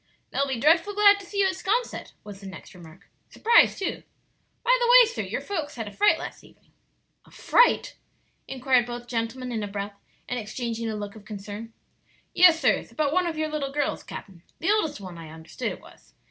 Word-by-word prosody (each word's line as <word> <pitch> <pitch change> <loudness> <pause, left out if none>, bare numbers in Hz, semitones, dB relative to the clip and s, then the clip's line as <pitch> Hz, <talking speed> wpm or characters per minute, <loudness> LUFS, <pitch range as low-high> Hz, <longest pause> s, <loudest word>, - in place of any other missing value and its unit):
"They'll 280 +1 0
be 265 -3 -3
dreadful 330 - +3
glad 405 -1 +6
to 395 - -12
see 400 +1 -1
you - - +4
at 380 -1 0
'Sconset," 455 +6 -2
was 205 -1 -10
the 195 - -9
next 190 - -11
remark; 175 +1 -15 0.2
"surprised, 470 +1 +4
too. 390 - -3 0.6
By - - +5
the 480 - +1
way, - - +9
sir, 470 - -4
your - - -4
folks 320 -8 -4
had 225 -3 -5
a - - -7
fright 415 - +3
last - - -8
evening." - - -22 0.5
"A - - -20
fright?" 485 - +2 0.5
inquired 255 -2 +1
both 240 0 -6
gentlemen 245 +2 -3
in 225 -2 -2
a 205 - -3
breath, 200 0 -6 0.3
and 245 - -2
exchanging 230 +1 -4
a 220 - -3
look 205 0 -6
of 215 - -13
concern. 205 +2 -8 0.6
"Yes, 350 -2 +6
sirs; - - +1
about 300 -2 -1
one 365 0 +2
of 325 -2 -4
your 310 0 -1
little 295 -3 -3
girls, 290 0 -1
capt'n 185 -4 -10 0.2
the 360 - +1
oldest 420 - 0
one, 185 -4 -9
I 160 -1 -10
understood 160 -1 -6
it - - -9
was. - - -19
255 Hz, 205 wpm, -25 LUFS, -, 0.6 s, way